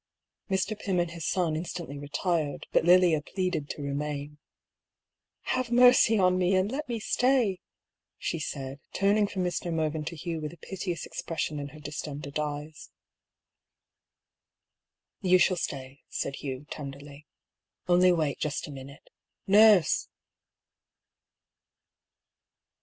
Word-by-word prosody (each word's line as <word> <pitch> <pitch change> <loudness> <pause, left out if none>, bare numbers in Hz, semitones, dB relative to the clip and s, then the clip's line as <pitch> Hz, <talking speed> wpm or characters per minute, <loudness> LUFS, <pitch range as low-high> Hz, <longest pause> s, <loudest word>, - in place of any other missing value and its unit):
Mr. 195 +3 0
Pym 195 -3 -1
and 175 -1 0
his 170 -2 -5
son 175 -5 +1
instantly 165 -3 -5
retired, 150 +1 -2
but - - +3
Lilia 175 -3 +5
pleaded 180 -3 -2
to 145 - -5
remain. 145 0 -3
^^ 150 - -21 1.1
Have 255 -2 0
mercy 245 -2 +6
on 185 -1 +3
me, 185 +1 +3
and 185 +3 +1
let 285 +1 -4
me 235 -1 -2
stay 250 +1 +2
I 185 - -9 0.3
" - - -62
she 165 - -3
said, 135 -2 -5
turning 205 +1 +3
from 190 -2 -3
Mr. 175 -1 -2
Mervyn 155 -1 -1
to 170 - -5
Hugh 165 0 -4
with 150 +1 -5
a - - -14
piteous 175 -1 -5
ex - - -6
pression 155 -2 -3
in 140 - -4
her 150 +2 -12
distended 150 -1 -5
eyes. 150 +1 -5 1.5
" 185 -3 -10
You 185 - +8
shall 180 +1 +3
stay," 135 -3 -5
said 140 - -3
Hugh, 135 0 -5
tenderly; 140 0 -8 0.3
" - - -51
only 180 +1 +5
wait 155 -5 0
just 150 -2 -2
a - - -8
minute. 140 +1 -11 0.4
Nurse 205 -4 +5
165 Hz, 140 wpm, -28 LUFS, 145-185 Hz, 1.5 s, You